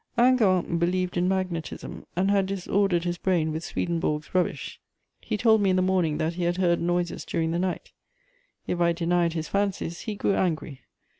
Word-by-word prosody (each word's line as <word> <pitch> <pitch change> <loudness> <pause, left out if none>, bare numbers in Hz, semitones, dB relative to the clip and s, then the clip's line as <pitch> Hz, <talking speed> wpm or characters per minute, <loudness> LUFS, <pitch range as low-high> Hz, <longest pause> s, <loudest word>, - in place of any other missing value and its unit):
Hingant 205 -9 +3
believed 180 +1 0
in 175 0 +1
magnetism, 185 -4 -3
and 190 +3 +2
had 195 -1 +2
disordered 195 -2 0
his 175 -1 -2
brain 170 -4 +1
with 160 +2 -4
Swedenborg's 160 -3 -2
rubbish. 185 -1 -1 0.4
He - - -2
told 220 0 +4
me 195 - +3
in 185 - +3
the 185 - +2
morning 180 -5 +1
that 160 +2 -1
he 175 0 -2
had 175 +1 0
heard 175 -2 +2
noises 175 0 -1
during 160 0 -1
the 170 - -1
night; 185 -1 -3 0.7
if 175 - -2
I 170 0 +4
denied 170 0 +1
his 160 -1 -3
fancies 195 -4 -1
he 215 - -4
grew 200 - +1
angry. 155 -7 -1
175 Hz, 180 wpm, -26 LUFS, 170-190 Hz, 0.7 s, told